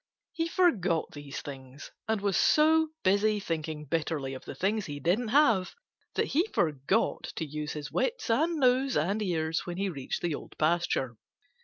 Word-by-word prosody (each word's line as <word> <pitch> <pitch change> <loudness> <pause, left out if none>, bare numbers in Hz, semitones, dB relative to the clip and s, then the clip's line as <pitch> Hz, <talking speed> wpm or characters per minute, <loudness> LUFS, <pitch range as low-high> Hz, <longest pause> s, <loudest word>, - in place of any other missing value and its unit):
He 330 0 -1
forgot 200 - +2
these 145 -1 -7
things 135 0 -9 0.2
and 220 -2 0
was 200 -2 +1
so 320 +1 +4 0.2
busy 205 +2 +3
thinking 155 -4 -4
bitterly 150 -2 -2
of 130 - -9
the - - -7
things 210 +2 0
he 145 -1 -5
didn't 190 - +1
have 225 -7 +3 0.4
that - - 0
he 335 +8 +2
forgot 155 - +1
to 160 - -2
use 150 +1 -5
his 145 -3 -6
wits 470 - -1
and 320 +8 +2
nose 260 -1 +3
and 195 +8 0
ears 165 -4 -1
when 175 0 -4
he 195 0 0
reached 140 -7 -4
the 170 -3 0
Old - - -8
Pasture. 155 -7 0
175 Hz, 170 wpm, -29 LUFS, 150-225 Hz, 0.4 s, so